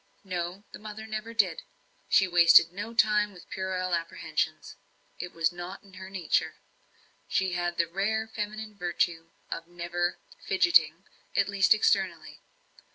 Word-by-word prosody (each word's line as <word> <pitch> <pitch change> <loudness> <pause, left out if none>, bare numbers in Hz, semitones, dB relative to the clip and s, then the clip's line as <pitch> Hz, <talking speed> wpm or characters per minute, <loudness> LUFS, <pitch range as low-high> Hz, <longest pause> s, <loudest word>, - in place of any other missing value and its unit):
No, 180 0 -4
the - - -10
mother 215 0 -8
never 215 +1 -5
did. 200 -8 +1 0.5
She 195 - +5
wasted 170 -1 +7
no 210 +4 -6
time 210 -2 +3
in 180 - -12
puerile 185 -1 -2
apprehensions 165 0 -2 0.4
it 180 - -5
was 165 0 +1
not 175 +3 -8
her 190 0 -9
nature; 185 -4 0 0.7
she 190 -1 0
had 175 0 -2
the 170 - +3
rare 205 +6 -1
feminine 215 0 -5
virtue 175 -3 -1 0.2
of 165 - -5
never 175 0 -2 0.3
"fidgetting" 170 -2 +4 0.3
at 200 - +3
least, 200 +1 +4
externally. 195 -3 0
185 Hz, 135 wpm, -28 LUFS, 175-210 Hz, 0.7 s, wasted